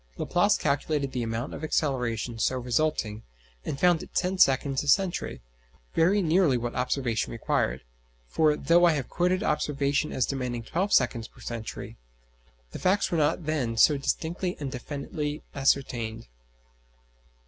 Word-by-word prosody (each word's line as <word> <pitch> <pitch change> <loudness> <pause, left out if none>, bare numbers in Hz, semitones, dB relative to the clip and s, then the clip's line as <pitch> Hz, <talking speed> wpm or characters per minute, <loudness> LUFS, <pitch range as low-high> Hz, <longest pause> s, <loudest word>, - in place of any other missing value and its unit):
Laplace - - +2
calculated 140 0 -1
the 125 -1 -2
amount 115 +3 -3
of - - -7
acceleration 125 -7 -1
so 130 +3 +1
resulting, 120 -4 -1 0.4
and 140 - -4
found 175 -2 +4
it - - -12
ten 185 +1 +1
seconds 135 -1 +3
a 145 - -7
century; 175 - +1 0.5
very 190 +5 +3
nearly 165 -5 +3
what 120 0 -3
observation 125 -2 -1
required; 115 - -1 0.4
for, 150 - +2
though 175 +1 +4
I 170 - +5
have 140 -4 -3
quoted 180 +3 +1
observation 145 -3 0
as 130 - +1
demanding 125 -3 -3
twelve 185 - -2
seconds 115 -2 +2
per - - -21
century, 115 -2 -6 0.7
the - - -7
facts 190 +2 +1
were 170 - +1
not 150 +2 +1
then 130 -7 -1
so 150 +6 +6
distinctly 170 +6 -2
and 140 -3 -4
definitely 145 +3 -5
ascertained. 125 - 0
140 Hz, 145 wpm, -27 LUFS, 120-160 Hz, 0.7 s, so